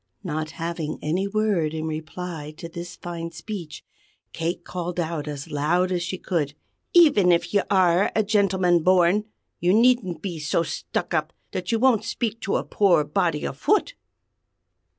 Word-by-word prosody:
Not 155 -3 -3
having 165 -2 -3
any 180 +6 0
word 200 -7 0
in 160 0 -3
reply 155 0 -5
to 170 - -7
this 170 +1 -8
fine 170 -1 -6
speech, 170 -1 -8 0.5
Kate 165 +2 -3
called 180 0 -4
out 160 -3 -2
as 145 -2 -6
loud 175 +6 +1
as 180 -1 0
she 175 +2 -3
could: 150 -6 -2 0.4
"Even 285 - +6
if 170 +3 +1
you 200 - +4
are 185 -1 +3
a 220 - +3
gentleman 190 -4 +2
born, 185 +4 +4 0.3
you 180 +3 +3
needn't 230 -8 +3
be 175 -5 -4
so 155 +2 +1
stuck 160 +2 -3
up 155 0 0 0.2
that 180 +1 -3
you 230 - +2
won't 245 -2 +3
speak 230 -2 -2
to 195 - -1
a - - -2
poor 185 -7 +3
body 165 0 0
afoot!" 415 - +1
175 Hz, 160 wpm, -24 LUFS, 160-195 Hz, 0.5 s, Even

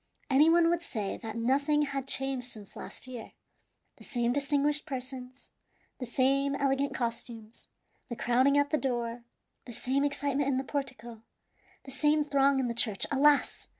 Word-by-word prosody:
Any 290 +4 +6
one 335 0 +5
would 345 -1 0
say 215 -11 -4
that 220 -2 -7
nothing 280 +6 +2
had 275 -2 -3
changed 270 -2 -1
since 210 -4 -12
last - - -8
year. 250 -3 -9 0.6
The - - -15
same 240 -2 -1
distinguished 290 +2 0
persons, 255 -1 -7 0.5
the 250 - -5
same 275 +3 +1
elegant 275 0 0
costumes, 230 -2 -5 0.4
the 235 - -4
crowding 255 +5 +3
at 285 0 +2
the 305 - +2
door, 240 -2 -2 0.4
the 240 - -9
same 265 +5 0
excitement 285 -1 0
in 265 - +1
the 265 - -1
portico, 245 -5 -5 0.6
the 270 - -10
same 295 +3 +2
throng 280 -1 +3
in 260 - 0
the 235 - -2
church. 220 -4 0
Alas! 285 +1 +3
270 Hz, 160 wpm, -30 LUFS, 240-285 Hz, 0.6 s, Any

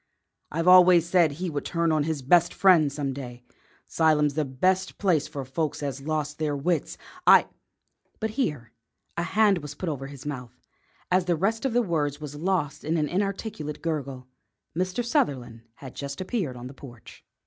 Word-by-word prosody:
"I've 165 +3 -2
always 180 -2 +7
said 170 -4 +3
he 175 +3 -4
would 145 -1 -3
turn 170 -1 0
on 155 -2 +1
his 155 -4 -3
best 170 +5 +4
friend 170 -7 +5
some 140 -1 -3
day. 125 -2 -8 0.4
'Sylum's 150 -3 +2
the 155 +1 0
best 185 +9 0
place 175 -7 +1
for 140 -2 -6
folks 150 +3 -3
as 140 -2 -3
has 140 - -11
lost 150 -1 -2
their 150 -2 -1
wits. 165 +4 -1 0.3
I - - +8 0.4
" - - -45
But 220 -1 -2
here 150 - -2 0.4
a - - -1
hand 200 +1 +3
was 145 -1 -8
put 180 - -4
over 135 -3 -4
his 140 -1 -11
mouth, 125 -4 -7 0.5
and 185 0 +4
the 175 - +2
rest 215 - -1
of 265 - 0
the 245 0 +3
words 150 -6 -1
was 150 -2 -7
lost 150 -2 -2
in 160 +3 0
an 150 -1 +1
inarticulate 195 -5 -3
gurgle. 140 -6 -3 0.5
Mr. 185 +7 -1
Sutherland 125 - -1
had 135 -3 -10
just 140 0 -6
appeared 185 - -3
on 120 - -8
the 130 - -8
porch. 120 -4 -13
155 Hz, 185 wpm, -26 LUFS, 140-180 Hz, 0.5 s, I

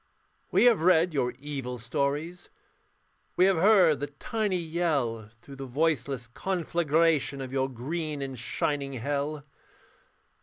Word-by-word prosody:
We - - +3
have 240 -7 +5
read 170 -1 +4
your 125 -4 0
evil 135 -3 -5
stories, 140 +9 -3 0.9
We 180 - +5
have 190 -2 +3
heard 180 -4 +5
the 145 - -3
tiny 200 +7 -2
yell 155 -10 -1
Through 140 -1 -11
the 135 0 -6
voiceless 140 -3 -1
conflagration 165 -1 0
Of 130 -1 -6
your 135 0 0
green 145 +4 -4
and 135 -3 -6
shining 140 +3 -2
hell. 140 +3 -3
145 Hz, 125 wpm, -28 LUFS, 135-170 Hz, 0.9 s, have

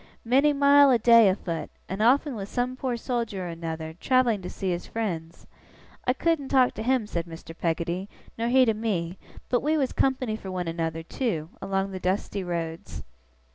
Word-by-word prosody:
Many 270 +5 +4
mile 285 0 +6
a 250 - +5
day 230 -2 +6
a 185 - +2
foot, 170 -5 -5 0.2
and 190 +2 -4
often 270 +5 +3
with 200 -2 -6
some 250 +1 -1
poor 255 -2 -2
soldier 230 -6 -3
or - - -4
another, 160 -1 -5
travelling 250 -5 +2
to 180 - -6
see 190 -1 -3
his 175 0 -4
friends. 170 -8 -4 0.6
I 250 - +4
couldn't 315 0 0
talk 260 -2 +4
to - - -6
him,' 250 0 +1
said 170 -4 -4
Mr. 165 0 -10
Peggotty, 170 +3 -2 0.3
'nor 230 +1 -2
he 255 +1 +5
to 225 - +2
me; 195 -5 -2 0.3
but 245 - +1
we 310 +3 +1
was 270 -4 0
company 255 -4 +1
for 195 -3 -8
one 180 -2 -3
another, 165 -1 -3
too, 165 - -3
along 195 0 -1
the 190 - -5
dusty 190 +1 -1
roads. 170 +1 -5
210 Hz, 190 wpm, -26 LUFS, 175-255 Hz, 0.6 s, mile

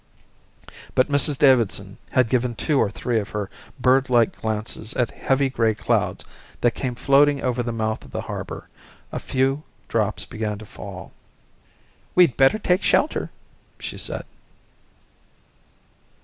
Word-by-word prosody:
But 130 +3 +3
Mrs 145 0 +5
Davidson 115 -8 +3
had 125 -2 +3
given 120 0 0
two 140 +6 +1
or 105 - +2
three 115 +2 -1
of 100 - -5
her 105 -2 -4 0.3
birdlike 125 -2 +3
glances 110 0 -2
at 120 -2 0
heavy 135 +1 +1
grey 115 -4 +1
clouds - - -1 0.4
that 120 - +4
came 125 +2 -4
floating 140 +2 +3
over 125 -1 0
the 120 0 -3
mouth 110 -1 -2
of - - -14
the - - -4
harbour. - - -6 0.4
A - - -3
few 135 +2 0 0.3
drops 110 -2 0
began 110 -2 -4
to 110 - -10
fall. 95 -2 -10 1.0
"We'd 175 -9 +5
better 135 +10 +4
take 185 -3 +1
shelter," 300 - +1 0.5
she - - -6
said. - - -2
120 Hz, 135 wpm, -23 LUFS, 110-135 Hz, 1.0 s, Mrs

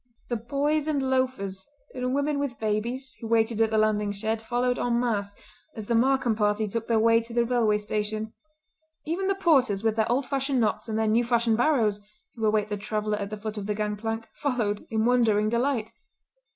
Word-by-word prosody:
The 240 - 0
boys 285 +6 0
and 275 -4 0
loafers, 255 -8 -1 0.3
and 255 0 -2
women 285 +1 0
with 275 -5 -3
babies, 235 +5 -2
who 225 - -5
waited 225 0 +2
at 225 - +4
the 220 - 0
landing 210 -1 +2
shed, 220 +2 -2
followed 245 +2 0
en 240 -1 +1
masse 205 -4 -1 0.4
as 220 - -6
the 235 - -1
Markam 255 -1 +2
party 210 0 +1
took 225 +2 -4
their 230 - +2
way 230 +1 +4
to 230 0 -10
the 235 0 +3
railway 230 -3 +2
station; 215 +1 -3 0.7
even 350 +5 -1
the 390 - +1
porters 265 - +2
with 225 -1 +1
their 220 +1 +1
old 260 +2 +1
fashioned 270 0 0
knots 220 +1 0
and 220 - -1
their 220 - +1
new 220 +3 +3
fashioned 235 -2 +2
barrows, 235 -7 +2 0.3
who 225 - -7
await 210 -1 +1
the 205 - -2
traveller 210 0 -2
at 200 -1 -4
the 215 - -5
foot 215 0 -5
of 200 - -6
the 210 - -1
gang 210 0 -1
plank, 225 +1 -4
followed 235 -8 -2
in 220 -1 0
wondering 225 -4 +3
delight. 235 -1 0
225 Hz, 205 wpm, -26 LUFS, 215-250 Hz, 0.7 s, at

